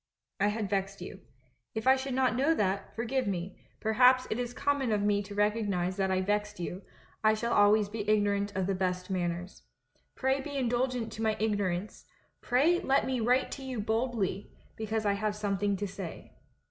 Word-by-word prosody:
I 200 - +3
had 210 0 -1
vexed 195 0 -2
you. 185 +1 -8 0.6
If 220 - -3
I 260 0 +7
should 265 -1 -3
not 255 -1 +2
know 285 +6 +3
that, 195 -4 -1
forgive 245 +1 -1
me; 185 -1 -3 0.2
perhaps 250 +3 +4
it 220 - -1
is 245 -1 -2
common 280 -1 0
of 205 -1 +1
me 205 0 +2
to 200 0 -8
recognise 205 -4 0
that 190 -1 +1
I 185 0 +1
vexed 210 +1 -1
you 180 +2 -4 0.2
— - - -30
I 215 0 +5
shall 235 +2 -1
always 205 0 +5
be 210 0 -4
ignorant 205 -1 +2
of 190 -1 0
the 195 - 0
best 185 0 -2
manners. 175 0 -3 0.5
Pray 265 +1 +1
be 285 0 -5
indulgent 245 -2 0
to 220 - -7
my 220 -1 +1
ignorance, 205 -3 -1 0.4
pray 305 +8 +3
let 270 +1 +2
me 260 -1 -1
write 245 +3 +2
to 275 - -6
you 260 -3 -4
boldly, 220 -2 -1 0.3
because 220 0 -2
I 200 - +3
have 205 +1 -1
something 205 -1 0
to 205 +1 -2
say. 190 -3 -8
210 Hz, 190 wpm, -30 LUFS, 195-245 Hz, 0.6 s, I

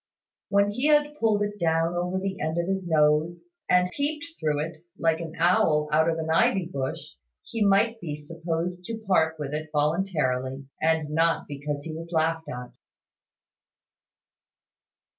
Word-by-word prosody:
When 200 +1 +3
he 250 +7 0
had 295 -1 +4
pulled 215 -2 +2
it 205 0 -4
down 165 0 +1
over 180 +1 -1
the 190 0 -3
end 160 +2 -1
of 170 0 0
his 190 -1 -2
nose, 155 - +2 0.2
and 180 0 +4
peeped 295 - -2
through 150 -1 0
it, 160 0 -9 0.2
like 165 -1 +1
an 165 -1 -6
owl 160 -3 +3
out 160 +2 +4
of 165 - 0
an 160 0 -2
ivy 175 +3 +3
bush, 135 - -5 0.3
he 225 -2 -2
might 210 +3 +3
be 150 -4 -4
supposed 165 +3 -4
to 225 +3 -4
part 170 -7 +1
with 150 -1 -5
it 155 +1 -4
voluntarily, 145 -5 0 0.2
and 160 -2 +1
not 165 +1 +2
because 145 0 -4
he 160 - -6
was 165 +2 -8
laughed 160 0 0
at. 125 0 -6
165 Hz, 160 wpm, -26 LUFS, 155-190 Hz, 0.3 s, had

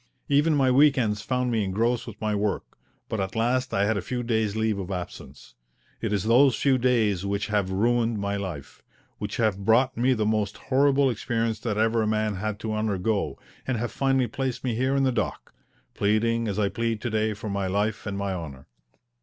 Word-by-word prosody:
Even 150 +2 +3
my 135 -2 +3
week 140 +2 +5
ends 105 -4 0
found 125 +2 -1
me 110 -2 +1
engrossed 115 +5 0
with 110 -2 -9
my 110 -1 -1
work, 105 -1 -2 0.3
but 110 - -3
at 95 0 -3
last 125 +3 +1
I 100 - +2
had 110 0 +1
a - - -1
few 125 +6 -3
days' 110 -3 0
leave 110 -2 0
of 95 -1 -5
absence. 90 -8 -7 0.5
It - - -2
is 100 -3 0
those 120 +3 +5
few 135 +1 +2
days 110 -7 +2
which 100 +1 -2
have 100 -3 +1
ruined 115 +3 +1
my 100 0 -2
life, 90 -9 -6 0.4
which 105 0 -4
have 105 -4 0
brought 120 +5 +3
me 125 +3 +2
the 110 -3 0
most 105 -1 0
horrible 140 0 +3
experience 115 -1 -2
that 110 -3 -2
ever 115 +1 +2
a 110 - 0
man 110 0 0
had 105 +1 -3
to 110 -1 -3
undergo, 105 -1 -1 0.3
and 130 -3 0
have 120 +1 -3
finally 135 -2 +1
placed 130 +1 -3
me 125 -3 0
here 130 +4 0
in 135 - +2
the 130 - +3
dock, 115 -3 -3 0.4
pleading 115 +3 +1
as 100 -1 -2
I 105 -2 +2
plead 115 0 -2
to 120 - -3
day 110 0 0
for 105 0 -6
my 100 -1 -1
life 105 +3 -1
and 100 -1 -3
my 100 -1 -2
honour. 75 -7 -7
110 Hz, 210 wpm, -26 LUFS, 100-120 Hz, 0.5 s, week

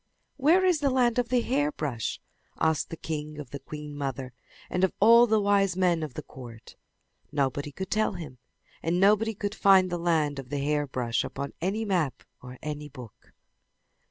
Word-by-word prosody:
"Where 330 +7 +4
is 360 -4 +3
the 285 -2 +2
land 250 -2 +2
of 240 -1 -1
the 250 -1 +2
hairbrush?" 240 - -1 0.4
asked 160 -1 +1
the 165 - -6
king 150 -1 -5
of 145 -4 -8
the 140 - -6
queen 150 +1 -8
mother, 135 -3 -4 0.3
and 180 - -1
of 190 - +3
all 235 +3 +7
the 220 -1 +3
wise 200 -2 +2
men 175 -3 +2
of 150 -5 -5
the - - -5
court. 120 -3 -12 0.6
Nobody 145 0 -1
could 190 +6 -6
tell 215 -1 +1
him, 150 -9 -8 0.4
and 170 +2 0
nobody 210 +3 +3
could 205 +1 -3
find 190 -4 +5
the 175 - -2
land 155 -4 +1
of 130 -2 -9
the 145 - -2
hairbrush 140 -5 -1
upon 140 0 -5
any 205 +6 -1
map 165 - -1 0.2
or 125 0 -9
in 125 - -15
any 150 -1 -5
book. 125 -6 -13
165 Hz, 185 wpm, -27 LUFS, 140-210 Hz, 0.6 s, all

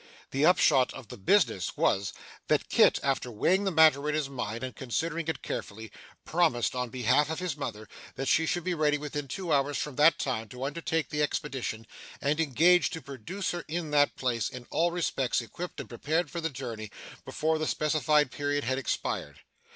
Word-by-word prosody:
The 140 +4 +3
upshot 140 -7 +4
of 125 -6 -10
the - - -8
business 100 - +2
was, 100 0 +1 0.4
that - - +1
Kit, - - +5
after 135 -2 0
weighing 185 - +1
the 195 - +1
matter 155 -3 +5
in 150 - 0
his 150 -3 -1
mind 120 -3 -4
and 130 - -5
considering 165 +6 -2
it 160 - -3
carefully, 110 +1 -6 0.3
promised, 160 -9 +1
on 125 -1 -2
behalf 130 +5 +2
of 160 - -2
his 180 -5 -3
mother, 110 -7 -6 0.3
that 135 +2 -3
she 160 +4 +3
should 175 0 -1
be 180 - -1
ready 150 -2 +2
within 145 -1 -5
two 170 +4 -2
hours 140 0 +1
from 150 -4 -4
that 150 +3 +6
time 115 -5 -2
to 125 +3 -7
undertake 160 +2 -2
the 150 - -1
expedition, 135 -7 -2 0.3
and 145 +2 0
engaged 165 +4 +4
to 160 - -5
produce 140 - -4
her 175 -1 -4
in 160 -1 -3
that 145 -1 +3
place, 120 -4 -1
in 125 -1 -9
all 170 +1 +2
respects 165 -7 0
equipped 150 +10 -7
and - - -6
prepared 155 +6 -1
for 170 - -4
the 165 - -1
journey, 115 -6 -6 0.3
before 160 0 -1
the 155 - -1
specified 150 -2 +2
period 145 0 -1
had 130 +2 0
expired. 135 - -3
145 Hz, 190 wpm, -29 LUFS, 125-160 Hz, 0.4 s, that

